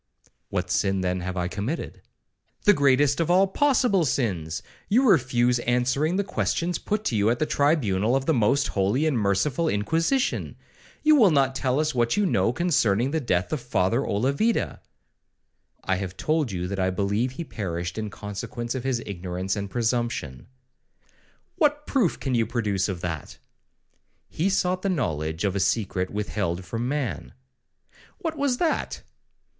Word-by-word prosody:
'—'What 90 -2 -2
sin, 95 0 +1
then, 90 0 -1
have 90 +1 -4
I 90 -1 0
committed?' 105 - -4 0.6
'The 205 - +6
greatest 140 -1 +3
of 165 - 0
all 185 +2 +5
possible 245 -3 +2
sins; 95 - -1 0.3
you 250 +6 +4
refuse 125 - +3
answering 125 +7 +1
the 200 - +1
questions 175 -3 -1
put 210 0 -2
to 120 - -1
you 105 +1 +3
at 120 - +1
the 155 - 0
tribunal 125 - +2
of 135 0 0
the 160 - +2
most 130 +3 +2
holy 100 +10 +1
and 155 -4 +1
merciful 115 - +1
Inquisition;—you 165 - 0
will 225 -9 +6
not 135 -4 +2
tell 130 0 0
us 155 0 0
what 120 +3 +1
you 205 - +3
know 105 - +2
concerning 130 - +1
the 160 - 0
death 95 - -1
of 150 - -2
Father 115 0 +1
Olavida.'—I 135 - -3
have 95 -1 -5
told 155 -3 0
you 90 -1 -3
that 100 +1 -4
I 95 0 +2
believe 100 +6 -1
he 170 - -5
perished 90 - -4
in 110 -1 -3
consequence 105 +4 -5
of 130 -2 -4
his 130 -3 -1
ignorance 95 -1 -3
and 100 -1 -4
presumption.' 115 - -2 1.1
'What 295 -1 +2
proof 240 - +1
can 135 - -2
you 115 -2 +2
produce 105 -5 -1
of 90 -3 -4
that?'—'He 90 - -7
sought 185 -1 0
the 195 - -1
knowledge 80 - -2
of 100 -2 0
a - - 0
secret 95 -1 0
withheld 100 -4 -3
from 115 +7 -3
man.' 140 -2 -3 0.8
'What 325 -4 -3
was 280 -4 0
that?' 330 +1 -1
120 Hz, 155 wpm, -25 LUFS, 100-160 Hz, 1.1 s, The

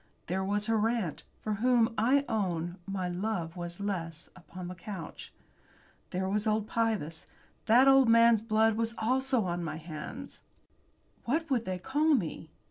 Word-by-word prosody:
There 190 +2 -1
was 205 +2 0
her 225 0 +2
aunt, 220 -10 -2 0.2
for 215 - -1
whom, 240 -2 +3
I 265 +6 +3
own, 175 -5 -1
my 190 -2 -2
love 180 -2 -3
was 175 0 -5
less, 170 -5 -4
upon 180 +1 -9
the 180 - -5
couch. 185 -2 -8 0.8
There 190 +1 -2
was 210 +3 0
old 215 0 +1
Pybus. 215 -10 -1 0.4
That 245 +4 +6
old 270 -3 +6
man's 230 -1 +6
blood 220 0 +2
was 230 0 -1
also 255 +1 +1
on 175 -1 -2
my 155 -2 -4
hands. 155 -1 -8 0.8
What 315 +5 -1
would 240 -3 +1
they 185 -1 -2
call 295 - +2
me? 165 - -3
210 Hz, 155 wpm, -30 LUFS, 175-230 Hz, 0.8 s, That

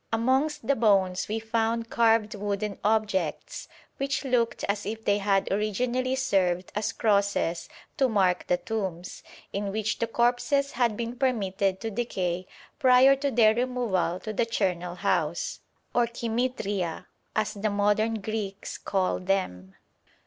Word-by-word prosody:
Amongst 265 +6 +1
the 280 - +2
bones 195 -5 +2
we 215 - -2
found 225 +1 -1
carved 225 -2 +3
wooden 205 0 -3
objects 205 -6 -1 0.3
which 275 +1 -2
looked 245 -3 0
as 200 0 -1
if 220 +2 -5
they 205 0 +3
had 195 -1 +1
originally 245 +6 0
served 185 -8 0
as 210 +1 -1
crosses 200 -5 0 0.3
to 265 -3 +3
mark 190 -5 +1
the 180 - +2
tombs, 190 -5 -4 0.3
in 200 0 -2
which 215 +1 -2
the 230 - 0
corpses 245 +5 +1
had 235 -4 +1
been 235 +1 -3
permitted 200 -7 0
to 225 - -3
decay 185 -5 -2 0.3
prior 260 0 +6
to 280 +1 0
their 220 -4 +5
removal 235 -8 0
to 215 - -5
the 230 +2 0
charnel 180 -5 -1
house, - - -1 0.3
or 240 -1 +3
koimêthêria, 225 -6 -2 0.3
as 215 -1 0
the 215 +1 -1
modern 210 +2 +1
Greeks 210 -2 -4
call 190 -2 0
them. 180 - -2
215 Hz, 140 wpm, -27 LUFS, 195-235 Hz, 0.3 s, prior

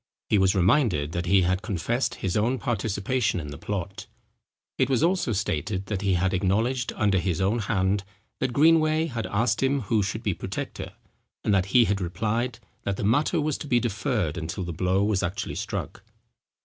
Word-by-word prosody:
He 105 - +4
was 95 +1 +3
reminded 95 - +2
that 85 +1 -3
he 95 0 +5
had 95 +2 +1
confessed 110 +5 -1
his 95 -1 -3
own 115 +5 +1
participation 110 -2 -1
in 75 -3 -6
the 75 - -7
plot. 95 -1 -5 0.7
It 130 - +3
was 130 +1 +2
also 180 -6 +2
stated, 95 0 -2
that 100 -1 -3
he 100 -2 +2
had 95 +2 +1
acknowledged, 110 +7 +1
under 100 -3 +2
his 90 -1 -1
own 100 +5 +1
hand, 100 -2 0 0.4
that 130 - 0
Greenway 155 +3 +4
had 120 -8 -4
asked 115 +5 +1
him 135 +1 +2
who 110 0 +1
should 100 +4 -3
be 105 - +1
protector? 95 +3 -6 0.5
and 105 - +2
that 95 -1 +2
he 120 +4 +5
had 100 -2 0
replied 110 +7 -1 0.2
that 100 -1 -2
the - - -3
matter 145 - +2
was 150 -1 -1
to - - -6
be 120 -3 +3
deferred 105 - -1
until 80 +4 -4
the 85 -1 -4
blow 95 +4 +1
was 105 -2 +1
actually 95 +3 -3
struck. - - -4
100 Hz, 190 wpm, -26 LUFS, 95-120 Hz, 0.7 s, he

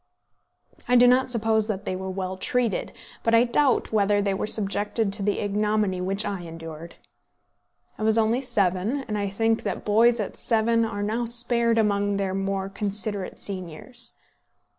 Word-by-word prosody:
I 250 - +3
do 245 0 +7
not 250 +1 +4
suppose 220 -2 +1
that 205 -2 -3
they 185 - -2
were 190 +1 -5
well 185 0 -4
treated, 235 +2 -1 0.3
but 230 0 +2
I 230 - +6
doubt 255 +2 +2
whether 205 -1 +3
they 200 -1 0
were 195 - -2
subjected 205 0 0
to 205 - +1
the 205 +1 0
ignominy 210 -2 0
which 195 +3 -1
I 195 -3 -3
endured. 165 -1 -9 1.0
I - - -7
was 220 +1 +3
only 225 +3 +2
seven, 205 +2 0
and 210 - -3
I 200 -1 -1
think 225 +3 +1
that 200 - -4
boys 230 +3 +4
at 210 - -4
seven 230 0 +2
are 205 -2 -4
now 225 +3 -1
spared 235 0 +1
among 205 -2 +1
their 195 -1 -1
more 195 0 -2
considerate 200 0 -3
seniors. 195 +6 -4
210 Hz, 165 wpm, -25 LUFS, 195-230 Hz, 1.0 s, do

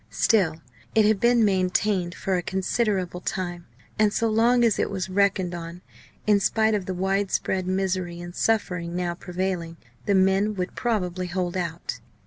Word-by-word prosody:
Still 190 -8 +2 0.4
it 220 -1 +5
had 215 -1 +3
been 235 0 +4
maintained 185 -1 +1
for 190 - -1
a 180 - 0
considerable 190 -1 -1
time; 175 -3 -4 0.3
and 215 -1 +4
so 225 +2 +1
long 235 +3 +3
as 225 -4 +3
it - - +1
was 190 -1 -4
reckoned 190 -2 +1
on, 170 +1 -7 0.4
in 210 -1 +4
spite 220 +2 +2
of 200 -3 -1
the 190 - -2
wide 195 +2 0
spread 185 -1 -1
misery 185 -2 -1
and 175 0 -8
suffering 180 -6 0
now 175 -1 -1
prevailing, 175 -1 -4 0.3
the 200 - +3
men 195 +3 +3
would 180 -1 -3
probably 185 -6 -1
hold 180 0 -2
out. 170 -2 -3
190 Hz, 165 wpm, -25 LUFS, 180-210 Hz, 0.4 s, it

